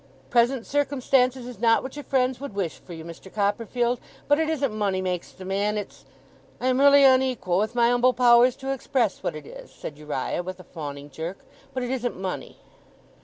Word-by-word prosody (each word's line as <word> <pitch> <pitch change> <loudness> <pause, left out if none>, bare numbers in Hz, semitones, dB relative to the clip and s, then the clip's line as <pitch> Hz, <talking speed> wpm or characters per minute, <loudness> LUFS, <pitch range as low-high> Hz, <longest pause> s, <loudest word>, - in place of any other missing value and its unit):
'Present 240 0 +3
circumstances 265 -3 +1
is 245 -4 -9
not 230 0 +4
what 260 +1 -7
your 295 - -5
friends 260 -1 0
would 280 -8 -6
wish 185 -5 -2
for 175 - -11
you, 160 -1 -8
Mister 170 +3 -10
Copperfield, 230 +4 0 0.3
but 290 +1 +4
it 320 -1 +1
isn't 280 -7 0
money 200 -3 0
makes 180 -2 -3
the 185 - -11
man: 200 +2 0
it's 205 - -7 0.5
I - - -4
am 255 0 +2
really 280 0 +7
unequal 255 -9 +3
with 215 +3 -1
my 235 0 +4
umble 245 +1 +4
powers 245 0 +5
to 270 0 -3
express 250 -5 -1
what - - -2
it 155 -2 -8
is,' - - -11
said 150 -1 -9
Uriah, 150 +1 -2
with 185 +1 -7
a - - -11
fawning 145 -4 -8
jerk, 165 +7 -6 0.3
'but 260 -1 -3
it 245 - -3
isn't 245 -5 -2
money! 190 -1 -5
235 Hz, 200 wpm, -25 LUFS, 185-260 Hz, 0.5 s, really